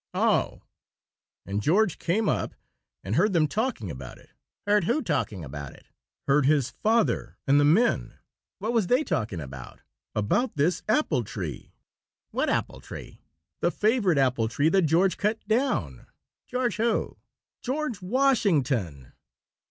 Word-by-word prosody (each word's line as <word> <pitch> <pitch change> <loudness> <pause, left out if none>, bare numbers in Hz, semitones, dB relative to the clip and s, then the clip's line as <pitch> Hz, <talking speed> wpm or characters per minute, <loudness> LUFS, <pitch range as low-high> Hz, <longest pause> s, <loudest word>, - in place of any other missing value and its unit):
"Oh!" - - +1 0.4
" - - -67
and 100 +2 -2
George 185 - +2
came 205 +5 0
up - - -1 0.5
and 100 +3 -2
heard 200 +4 +3
them 160 -3 +3
talking 215 - -2
about 65 -3 -9
it - - -21 0.2
" - - -61
"Heard 205 -3 +3
who 270 - +1
talking 115 - -2
about 70 -1 -7
it?" - - -20 0.4
"Heard 140 0 +4
his 145 -4 +2
father 225 +1 0
and 140 +1 +4
the - - +4
men." 195 +12 +2 0.4
"What 220 +4 -2
was 225 -6 +2
they 250 +8 +3
talking 110 - -2
about?" 65 -4 -9 0.3
"About 165 - 0
this 155 +4 +1
apple 215 - +2
tree." 90 - -7 0.6
"What - - 0
apple - - -2
tree?" - - -10 0.4
"The - - +2
favorite 210 - +2
apple 125 -4 +2
tree 145 +7 +1
that 185 -1 +3
George 180 +5 +3
cut 210 +1 -1
down." 215 - -1 0.4
"George 250 -3 -1
who?" 230 0 0 0.4
"George 255 -5 -3
Washington." 155 - +1
165 Hz, 145 wpm, -26 LUFS, -, 0.6 s, Heard